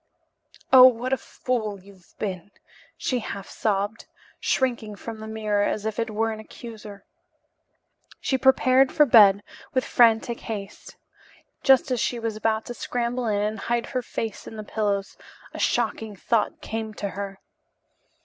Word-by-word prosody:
"Oh, 255 Hz, -1 st, +11 dB
what 250 Hz, +1 st, 0 dB
a -, -, +2 dB
fool 220 Hz, -5 st, -3 dB
you've 190 Hz, -1 st, -19 dB
been," 190 Hz, -2 st, -4 dB, 0.5 s
she 255 Hz, -, -1 dB
half 200 Hz, -3 st, -6 dB
sobbed, 205 Hz, 0 st, -2 dB, 0.3 s
shrinking 235 Hz, -5 st, -1 dB
from 220 Hz, +2 st, -8 dB
the 220 Hz, -, -7 dB
mirror 215 Hz, -2 st, 0 dB
as 210 Hz, +1 st, -1 dB
if 220 Hz, 0 st, -3 dB
it 230 Hz, 0 st, -1 dB
were 225 Hz, +1 st, 0 dB
an 215 Hz, -, -6 dB
accuser. 215 Hz, -3 st, -11 dB, 1.1 s
She 265 Hz, -, 0 dB
prepared 265 Hz, 0 st, +4 dB
for 300 Hz, -, +5 dB
bed 205 Hz, -5 st, +7 dB, 0.3 s
with 255 Hz, +1 st, +2 dB
frantic 230 Hz, 0 st, +3 dB
haste. 205 Hz, -3 st, -7 dB, 0.7 s
Just 265 Hz, -1 st, +4 dB
as 250 Hz, -, +1 dB
she 240 Hz, -, 0 dB
was 225 Hz, -2 st, -3 dB
about 220 Hz, 0 st, 0 dB
to 240 Hz, -, -6 dB
scramble 240 Hz, 0 st, -2 dB
in 205 Hz, -1 st, +1 dB
and 215 Hz, +1 st, -2 dB
hide 235 Hz, 0 st, -1 dB
her 255 Hz, -, -3 dB
face 225 Hz, -3 st, -5 dB
in -, -, -8 dB
the 215 Hz, -, -6 dB
pillows, 205 Hz, -2 st, -2 dB, 0.4 s
a -, -, -7 dB
shocking 220 Hz, -2 st, 0 dB
thought 225 Hz, +3 st, -1 dB
came 220 Hz, -1 st, -5 dB
to 200 Hz, -, -3 dB
her. 195 Hz, 0 st, -6 dB
220 Hz, 155 wpm, -25 LUFS, 205-240 Hz, 1.1 s, Oh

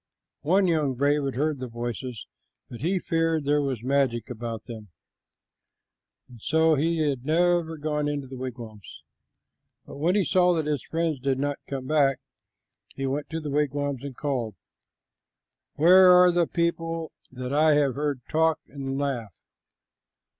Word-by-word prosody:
One 185 Hz, +7 st, +3 dB
young 155 Hz, -6 st, +1 dB
brave 145 Hz, +3 st, +1 dB
had 135 Hz, -, -3 dB
heard 150 Hz, +1 st, -1 dB
the 130 Hz, -, -5 dB
voices, 120 Hz, 0 st, -5 dB, 0.5 s
but 120 Hz, -, -9 dB
he 180 Hz, +6 st, +1 dB
feared 165 Hz, -3 st, 0 dB
there 145 Hz, +1 st, +2 dB
was 130 Hz, -5 st, -3 dB
magic 130 Hz, -3 st, 0 dB
about 115 Hz, -2 st, -5 dB
them, 110 Hz, -3 st, -9 dB, 1.4 s
and 120 Hz, -3 st, -15 dB
so 160 Hz, +4 st, +3 dB
he 160 Hz, +1 st, +1 dB
had 135 Hz, -4 st, -2 dB
never 165 Hz, +1 st, +1 dB
gone 150 Hz, 0 st, -2 dB
into 145 Hz, -2 st, -3 dB
the 130 Hz, 0 st, -9 dB
wigwams; 120 Hz, -5 st, -9 dB, 0.8 s
but -, -, -10 dB
when 170 Hz, +6 st, +1 dB
he 205 Hz, -, +3 dB
saw 180 Hz, +1 st, +3 dB
that 160 Hz, -2 st, -1 dB
his 150 Hz, -4 st, -1 dB
friends 165 Hz, -3 st, -1 dB
did 135 Hz, 0 st, 0 dB
not 145 Hz, +1 st, -2 dB
come 135 Hz, -2 st, -4 dB
back, 140 Hz, -2 st, +2 dB, 0.8 s
he 135 Hz, -, -3 dB
went 140 Hz, +2 st, -3 dB
to 160 Hz, -, -3 dB
the 150 Hz, -2 st, -5 dB
wigwams 145 Hz, -2 st, -1 dB
and 140 Hz, -3 st, -7 dB
called, 125 Hz, -8 st, -2 dB, 1.2 s
"Where 185 Hz, +4 st, +7 dB
are 180 Hz, 0 st, +8 dB
all 180 Hz, -, +5 dB
the 170 Hz, -1 st, +2 dB
people 165 Hz, -1 st, -2 dB, 0.2 s
that 125 Hz, +1 st, -5 dB
I 155 Hz, +1 st, +4 dB
have 145 Hz, -3 st, +2 dB
heard 145 Hz, -2 st, -2 dB
talk 160 Hz, 0 st, +2 dB
and 135 Hz, -1 st, -5 dB
laugh?" 130 Hz, -7 st, -2 dB
145 Hz, 160 wpm, -26 LUFS, 130-160 Hz, 1.4 s, are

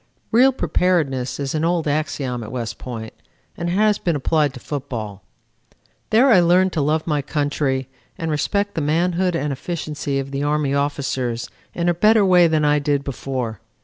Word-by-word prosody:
Real 255 Hz, +4 st, +6 dB
preparedness 155 Hz, -, 0 dB
is 140 Hz, -1 st, -2 dB
an 155 Hz, 0 st, -1 dB
old 170 Hz, -1 st, +1 dB
axiom 145 Hz, -4 st, -2 dB
at 110 Hz, -, -7 dB
West 120 Hz, -2 st, -5 dB
Point 115 Hz, -3 st, -7 dB, 0.4 s
and 170 Hz, 0 st, -3 dB
it -, -, -1 dB
has 210 Hz, +1 st, +3 dB
been 170 Hz, -3 st, 0 dB
applied 150 Hz, +1 st, +1 dB
to -, -, -8 dB
football. 120 Hz, -9 st, -5 dB, 0.9 s
There 245 Hz, +5 st, +5 dB
I 195 Hz, -, +7 dB
learned 180 Hz, +2 st, +3 dB
to 155 Hz, -, 0 dB
love 155 Hz, +2 st, 0 dB
my 150 Hz, -3 st, 0 dB
country 145 Hz, -2 st, -1 dB, 0.3 s
and 165 Hz, -1 st, -3 dB
respect 200 Hz, +7 st, 0 dB
the 160 Hz, -, -2 dB
manhood 175 Hz, +4 st, +1 dB
and 150 Hz, -3 st, -1 dB
efficiency 150 Hz, -1 st, -4 dB
of 135 Hz, 0 st, -4 dB
the 140 Hz, 0 st, -3 dB
Army 145 Hz, -1 st, 0 dB
officers 135 Hz, -4 st, -2 dB, 0.2 s
in 170 Hz, 0 st, -1 dB
a 175 Hz, -, +4 dB
better 210 Hz, +4 st, +4 dB
way 180 Hz, -2 st, +6 dB
than 155 Hz, -2 st, +1 dB
I 150 Hz, 0 st, +3 dB
did 145 Hz, -1 st, 0 dB
before. 130 Hz, -5 st, -4 dB
150 Hz, 180 wpm, -21 LUFS, 135-175 Hz, 0.9 s, I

